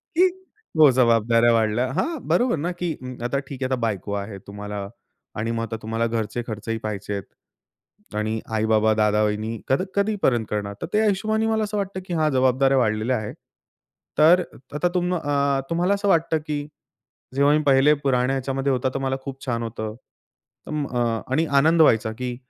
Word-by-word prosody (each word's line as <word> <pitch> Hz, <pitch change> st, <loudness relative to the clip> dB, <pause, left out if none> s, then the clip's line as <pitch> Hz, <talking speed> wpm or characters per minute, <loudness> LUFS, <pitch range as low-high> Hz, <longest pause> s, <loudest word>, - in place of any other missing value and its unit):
की 365 Hz, +2 st, +6 dB, 0.5 s
हो, 155 Hz, -3 st, +8 dB
जबाबदाऱ्या 115 Hz, -1 st, +4 dB
वाढल्या. 115 Hz, +3 st, +1 dB
हां, 320 Hz, -, -1 dB
बरोबर 245 Hz, -4 st, +2 dB
ना, 170 Hz, +5 st, -2 dB
की 175 Hz, -3 st, -1 dB
अं, 125 Hz, 0 st, -6 dB
आता 140 Hz, +3 st, 0 dB
ठीक 135 Hz, -1 st, -7 dB
आहे, 130 Hz, -, +1 dB
आता -, -, +3 dB
बायको 100 Hz, -3 st, -2 dB
आहे 100 Hz, 0 st, -4 dB
तुम्हाला 105 Hz, 0 st, -6 dB, 0.5 s
आणि 115 Hz, +1 st, -1 dB
मग 115 Hz, -, -2 dB
आता 115 Hz, 0 st, -4 dB
तुम्हाला 115 Hz, +1 st, -1 dB
घरचे 115 Hz, +1 st, -2 dB
खर्चही 110 Hz, +1 st, -4 dB
पाहायचे 105 Hz, -1 st, -4 dB
आहेत. 100 Hz, -1 st, -3 dB, 0.9 s
आणि 110 Hz, +1 st, -1 dB, 0.2 s
आई-बाबा, 110 Hz, 0 st, +3 dB
दादा-वहिनी 105 Hz, +1 st, +1 dB, 0.2 s
कध 135 Hz, +6 st, +2 dB
कधीपर्यंत 200 Hz, -, +1 dB
करणार? 100 Hz, -1 st, -3 dB
तर -, -, -2 dB
त्या 215 Hz, +1 st, +3 dB
हिशोबाने 215 Hz, +2 st, +1 dB
मला 220 Hz, -1 st, +1 dB
असं 210 Hz, 0 st, -3 dB
वाटतं 195 Hz, -1 st, -3 dB
की 180 Hz, -, -4 dB
हां, 155 Hz, -1 st, +2 dB
जबाबदाऱ्या 130 Hz, +1 st, +3 dB
वाढलेल्या 110 Hz, +1 st, +1 dB
आहेत. 110 Hz, -1 st, -6 dB, 0.8 s
तर 170 Hz, +4 st, +7 dB
अ, -, -, -10 dB, 0.2 s
आता 175 Hz, +4 st, +1 dB
तुम 180 Hz, 0 st, +1 dB
अ, 140 Hz, -3 st, +1 dB
तुम्हाला 175 Hz, +4 st, +1 dB
असं 200 Hz, 0 st, -2 dB
वाटतं 165 Hz, -2 st, +3 dB
की 150 Hz, -1 st, -1 dB, 0.8 s
जेव्हा 140 Hz, +1 st, +4 dB
मी -, -, 0 dB
पहिले 140 Hz, +1 st, +5 dB
पुराण्या 130 Hz, -1 st, +2 dB
ह्याच्यामध्ये 135 Hz, +1 st, -1 dB
होता, 130 Hz, +1 st, 0 dB
तर -, -, 0 dB
मला 135 Hz, 0 st, -1 dB
खूप 135 Hz, 0 st, -8 dB
छान 115 Hz, -2 st, -1 dB
होतं. 110 Hz, -1 st, -5 dB, 0.7 s
अं, 150 Hz, -2 st, -2 dB
अ, 120 Hz, -2 st, -1 dB
आणि 160 Hz, +5 st, +2 dB
आनंद 160 Hz, +3 st, +4 dB
व्हायचा 110 Hz, -6 st, +4 dB
की 125 Hz, -1 st, -3 dB
130 Hz, 180 wpm, -23 LUFS, 110-155 Hz, 0.9 s, हो